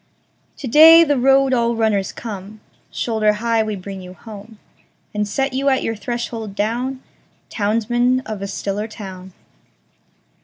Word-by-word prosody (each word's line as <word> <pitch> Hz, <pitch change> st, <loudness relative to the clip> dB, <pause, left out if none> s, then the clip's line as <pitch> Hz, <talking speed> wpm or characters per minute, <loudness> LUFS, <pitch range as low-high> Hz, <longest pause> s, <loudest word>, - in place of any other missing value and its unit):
To 275 Hz, -, -6 dB
day, 320 Hz, +6 st, +8 dB
the 290 Hz, -3 st, +1 dB
road 270 Hz, +1 st, +4 dB
all 235 Hz, -1 st, +1 dB
runners 215 Hz, -4 st, 0 dB
come, 210 Hz, -1 st, -8 dB, 0.3 s
Shoulder 220 Hz, -2 st, 0 dB
high 230 Hz, +1 st, 0 dB
we 215 Hz, -1 st, -2 dB
bring 195 Hz, 0 st, -8 dB
you 180 Hz, 0 st, -11 dB
home, 215 Hz, +1 st, -12 dB, 0.6 s
And 210 Hz, 0 st, -1 dB
set 270 Hz, +6 st, -1 dB
you 275 Hz, +2 st, +1 dB
at 265 Hz, -, +1 dB
your 225 Hz, -, -2 dB
threshold 225 Hz, -1 st, -5 dB
down, 245 Hz, +6 st, -2 dB, 0.5 s
Townsman 240 Hz, +4 st, +1 dB
of 215 Hz, -6 st, -7 dB
a 200 Hz, -, -3 dB
stiller 200 Hz, +2 st, -4 dB
town. 190 Hz, -4 st, -10 dB
225 Hz, 145 wpm, -19 LUFS, 205-250 Hz, 0.6 s, day